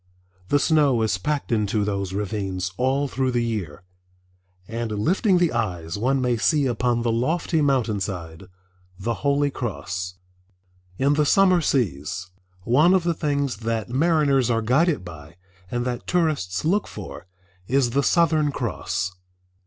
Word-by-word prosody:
The 145 - +3
snow 145 -6 +3
is 105 -4 0
packed 150 +6 -2
into 105 -2 +1
those 100 -2 -2
ravines 95 -2 -3
all 135 +4 +1
through 130 -1 -1
the 120 -1 0
year, 100 -10 -4 0.8
and 115 0 -3
lifting 180 - +2
the 175 -2 +2
eyes 90 -8 -2
one 130 +6 +1
may 125 -2 +1
see 145 +5 +2
upon 120 -1 0
the 120 - +1
lofty 155 +7 0
mountain 125 -7 +1
side 90 -2 -5 0.5
the 115 +5 -2
Holy 145 0 +2
Cross. 95 -7 -4 0.8
In 140 +2 +2
the 150 0 +2
summer 185 -1 +4
seas, 90 - -1 0.3
one 150 - +4
of 185 - +2
the 170 0 +1
things 140 -6 -1
that 115 -1 -3
mariners 140 -2 +2
are 115 -1 +1
guided 140 - +2
by 75 -3 -11 0.3
and 120 +2 -2
that 125 -1 -4
tourists 150 - 0
look 195 +6 +1
for, 95 -2 -9 0.4
is 130 -2 +2
the 140 - +2
Southern 155 -1 +2
Cross. 95 -7 -3
120 Hz, 145 wpm, -23 LUFS, 100-145 Hz, 0.8 s, summer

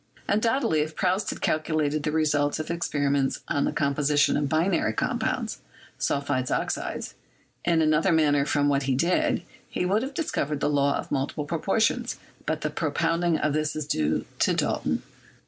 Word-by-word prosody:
Undoubtedly, 225 - +2
if 155 +1 -2
Proust 190 +2 0
had - - -5
calculated 155 -1 0
the 150 - -1
results 150 -2 +1
of 155 - -5
his 170 - 0
experiments 145 -4 0
on 140 - +1
the - - 0
composition 145 0 +2
of 145 -1 0
binary 160 - +1
compounds - - -1 0.4
(sulphides, 140 -3 0
oxides) - - -2 0.5
in 165 -2 +3
another 155 +4 +3
manner 150 -3 +3
from 145 0 +1
what 140 -1 +2
he 130 - +3
did, 170 +7 +1 0.3
he - - -2
would 200 +4 +2
have 270 +2 -5
discovered 150 - -1
the - - +1
law 140 -1 +2
of - - -7
multiple 145 +1 -1
proportions, 220 +9 0 0.3
but 155 0 -1
the 150 - -2
propounding 165 +2 0
of 150 - 0
this 155 0 -1
is 155 -2 -3
due 80 - 0
to - - +3
Dalton. - - -1
155 Hz, 165 wpm, -26 LUFS, 145-170 Hz, 0.5 s, in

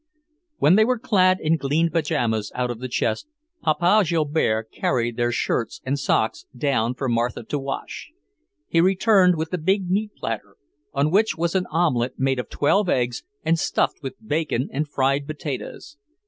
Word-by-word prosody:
When 165 +7 +5
they 220 - +6
were 250 +2 +1
clad 185 -5 +3
in 160 +1 +1
clean 160 +4 +1
pyjamas 125 -10 0
out 125 -1 -1
of 115 - -7
the 130 - -4
chest, 120 - -1 0.3
Papa 175 +7 +3
Joubert 150 - 0
carried 120 -3 -1
their 120 0 0
shirts 120 -1 -1
and 140 +2 -1
socks 110 -4 0
down 125 -3 0
for 135 - -3
Martha 120 0 -1
to 145 +6 -3
wash. 135 0 -6 0.6
He 165 - +3
returned 190 0 +4
with 160 +1 -3
the 180 - -1
big 190 +2 0
meat 210 +2 -1
platter, 105 -3 -5 0.4
on 145 +2 +1
which 200 -4 +2
was 170 +1 0
an 185 -1 0
omelette 130 -7 0
made 135 -1 +1
of - - -5
twelve 185 +6 +2
eggs 120 -1 0 0.2
and 165 +1 +2
stuffed - - 0
with 135 -2 -6
bacon 155 - -1
and 145 +2 -2
fried 140 +1 0
potatoes. 155 - -6
150 Hz, 170 wpm, -23 LUFS, 125-175 Hz, 0.6 s, they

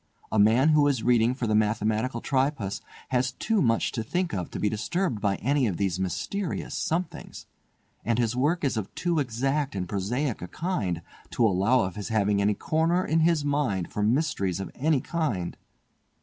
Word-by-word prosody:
A 110 - +2
man 115 +8 +5
who 150 -2 +5
is 130 -6 0
reading 120 0 +3
for 130 - -3
the 110 - 0
Mathematical 110 +3 +1
Tripos 130 -7 -1 0.3
has 130 0 +1
too 220 - 0
much 115 -3 +2
to 115 - -3
think 175 +9 -2
of 90 -3 -3
to - - -6
be 105 - +1
disturbed 115 - -1
by 100 -2 +1
any 135 +3 +1
of 90 -5 -2
these 95 -3 -1
mysterious 175 - -3
'somethings', 170 +1 -3 0.6
and 115 -1 0
his 120 -1 +1
work 150 +7 +1
is 135 -5 0
of 105 -3 -4
too 170 -3 0
exact 135 +1 -1
and 90 -2 -2
prosaic 110 +7 -2
a 90 - -5
kind 95 - -2 0.3
to 120 - +2
allow 110 +5 +3
of 95 0 -3
his 105 - -4
having 105 -2 +2
any 105 +1 +2
corner 165 - +1
in 160 - +2
his 160 -2 +2
mind 140 -12 0
for 105 - -2
mysteries 105 - +1
of 95 - -5
any 150 0 +1
kind. 125 - -2
120 Hz, 185 wpm, -27 LUFS, 105-150 Hz, 0.6 s, man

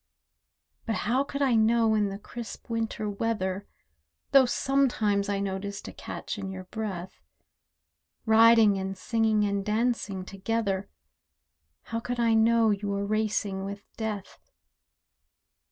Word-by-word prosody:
But 225 - 0
how 250 +5 +2
could 280 0 -3
I 260 -3 +3
know 225 0 +4
in 210 -2 +2
the 195 - -5
crisp 235 +2 -9
winter 225 -2 -2
weather 200 -2 -2 0.6
(Though 270 -2 +7
sometimes 230 -7 +1
I 200 -1 0
noticed 200 0 -4
a - - -8
catch - - -6
in 195 -1 -4
your 190 -1 -6
breath), 190 -3 -6 1.0
Riding 220 -2 +6
and 190 0 -4
singing 220 +1 +1
and 200 -1 -1
dancing 210 -3 -1
together, 195 0 -2 0.9
How 230 - -3
could 245 +1 -4
I 230 -1 +3
know 225 0 +4
you 205 0 -2
were 200 0 -1
racing 210 -2 -1
with 200 +1 -6
death? 215 -3 -5
215 Hz, 130 wpm, -28 LUFS, 200-230 Hz, 1.0 s, Though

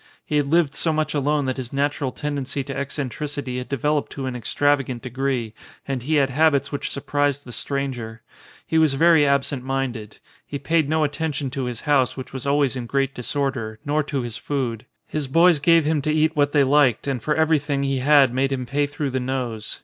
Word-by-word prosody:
He 150 - 0
had 145 -1 +1
lived 160 -1 +2
so 165 - 0
much 155 -1 -1
alone 145 0 +1
that 130 0 -2
his 125 -2 -5
natural 140 -1 -1
tendency 140 -1 -3
to 135 0 -6
eccentricity 140 -1 -3
had 125 - -7
developed 145 +2 0
to 135 - -5
an 130 -1 -3
extravagant 130 0 0
de 125 - -6
gree, 130 -4 -2 0.3
and 135 -2 -2
he 155 +6 0
had 135 -2 +3
habits 140 -1 +2
which 140 - -3
surprised 145 0 -1
the 120 - -9
stranger. 120 -4 -4 0.4
He 160 - +1
was 155 -4 +3
very 160 0 +5
absent 140 -1 0
minded. 130 -5 -3 0.3
He 145 - -5
paid 155 +1 +1
no 160 0 +2
attention 145 -2 -2
to 135 -1 -3
his 125 -1 -5
house, 135 -6 +2
which 130 - -8
was 130 0 -5
always 140 -2 +2
in 125 -2 -5
great 135 +1 0
disorder, 125 -3 -3
nor 150 +2 +1
to 140 -3 -2
his 120 -1 -5
food; 125 -6 -3 0.2
his 150 -3 -3
boys 165 +3 +5
gave 165 +1 +4
him 155 -1 +1
to 155 - 0
eat 155 +1 +2
what 145 -1 +2
they 145 -2 +4
liked 135 -3 +3
and 135 -4 -1
for 150 +5 0
everything 150 -3 +1
he 135 -1 0
had 140 -2 +5
made 135 +2 +1
him 130 -2 -2
pay 145 +4 0
through 145 -1 -3
the 130 - -1
nose. 125 -4 -4
140 Hz, 210 wpm, -23 LUFS, 130-150 Hz, 0.4 s, very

